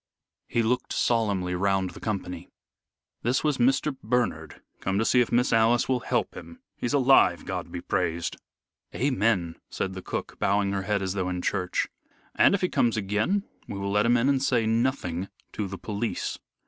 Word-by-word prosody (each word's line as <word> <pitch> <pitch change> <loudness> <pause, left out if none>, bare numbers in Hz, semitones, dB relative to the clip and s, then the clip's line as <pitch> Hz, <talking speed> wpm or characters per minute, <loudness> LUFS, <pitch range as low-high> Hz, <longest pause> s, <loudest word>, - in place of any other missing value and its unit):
He 115 - +1
looked 125 +3 0
solemnly 100 -6 +1
round 95 0 +1
the - - -11
company. 90 -5 -4 0.7
"This 125 +3 +1
was 150 -4 +1
Mr. 135 +3 +2
Bernard 125 +2 -1 0.2
come 95 0 -1
to 110 - +1
see 125 - +4
if 120 - 0
Miss 125 +2 +2
Alice 115 +2 +4
will 130 -1 +1
help 120 -1 -1
him. 250 - -10 0.2
He's 120 - -3
alive, 135 -1 +4
God - - -4
be - - -5
praised!" 85 0 -1 0.6
"Amen," 105 -10 +1
said 95 - -3
the 95 - -6
cook, - - -5
bowing 100 0 +2
her 100 -1 -1
head 100 0 -1
as 95 -1 -1
though 95 -2 -1
in 90 -1 -3
church. 90 -3 0 0.5
"And - - +5
if 200 - -2
he 180 - +2
comes 115 -2 +2
again, 105 - 0 0.2
we 100 - -5
will 100 0 -2
let 105 +2 +3
him 120 +1 +4
in 120 +3 +2
and 140 -2 +2
say 125 -4 +2
nothing 110 -6 0 0.2
to 105 - -2
the 100 0 -6
police." 105 +5 -3
110 Hz, 185 wpm, -27 LUFS, 95-125 Hz, 0.7 s, And